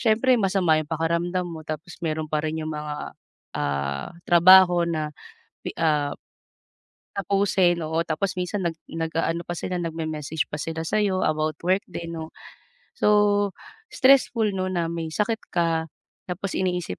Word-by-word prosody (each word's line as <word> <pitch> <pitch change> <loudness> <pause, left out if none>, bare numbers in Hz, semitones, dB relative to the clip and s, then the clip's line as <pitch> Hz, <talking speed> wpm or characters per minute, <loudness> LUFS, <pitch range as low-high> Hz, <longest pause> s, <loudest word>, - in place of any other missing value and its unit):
siyempre 235 +3 +3
masama 185 -5 +3
yung 150 - -7
pakiramdam 170 +3 0
mo, 165 -2 -7
tapos 155 +3 -7
meron 155 -2 -2
pa 150 0 -1
rin 155 0 -2
yung 155 - -4
mga, 150 -1 -5 0.4
ah, 70 -1 -2 0.2
trabaho 175 0 +7
na 155 -2 -2 0.5
pi - - -3
ah, 150 -3 +2 1.1
tapusin, 190 -3 +2
oo, 160 +1 -2
tapos 185 +4 -2
minsan 180 +2 -2
nag 170 -2 -1
nag-aano 165 +1 -2
pa 175 - -5
sila, 185 - -3
nagme-message 160 -2 -3
pa - - -5
sila 160 +1 -3
sa 215 - +1
'yo 185 -2 +1
about 155 0 0
work 185 +3 +2
din 170 -2 -6
'no. 160 0 -6 0.7
So, 205 -1 +3 0.4
stressful 250 -5 +4
'no 185 0 -1
na 170 -2 0
may 165 -1 -4
sakit 215 +1 0
ka, 165 -2 +1 0.4
tapos 185 +2 -4
iniisip 180 - -2
170 Hz, 150 wpm, -24 LUFS, 155-185 Hz, 1.1 s, trabaho